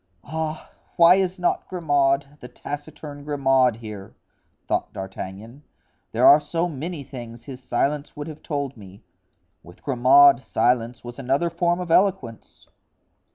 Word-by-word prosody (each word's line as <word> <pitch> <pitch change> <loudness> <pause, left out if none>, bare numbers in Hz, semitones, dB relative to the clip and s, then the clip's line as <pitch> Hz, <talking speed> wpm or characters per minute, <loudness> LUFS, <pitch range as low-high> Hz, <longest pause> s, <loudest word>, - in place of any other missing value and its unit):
"Ah! 160 +1 -5 0.2
why 170 +1 +7
is 190 0 0
not 175 -1 -1
Grimaud, 145 -4 0
the 125 - -10
taciturn 145 +2 -8
Grimaud, 135 -4 +2
here?" 105 -4 -10 0.5
thought - - -1
D'Artagnan, 95 +6 -8 0.5
"there - - +2
are 145 - +9
so 165 +3 -2
many 160 0 -6
things 120 -3 -10
his 130 0 -10
silence 140 +4 -2
would 145 -1 -6
have 155 -1 -9
told 140 -3 -4
me; 100 -3 -14 0.6
with 85 - -17
Grimaud 135 0 +5
silence 120 +1 0
was 120 +2 -9
another 135 +6 0
form 175 +1 0
of 180 -2 -5
eloquence!" 180 - 0
140 Hz, 135 wpm, -23 LUFS, 120-155 Hz, 0.6 s, are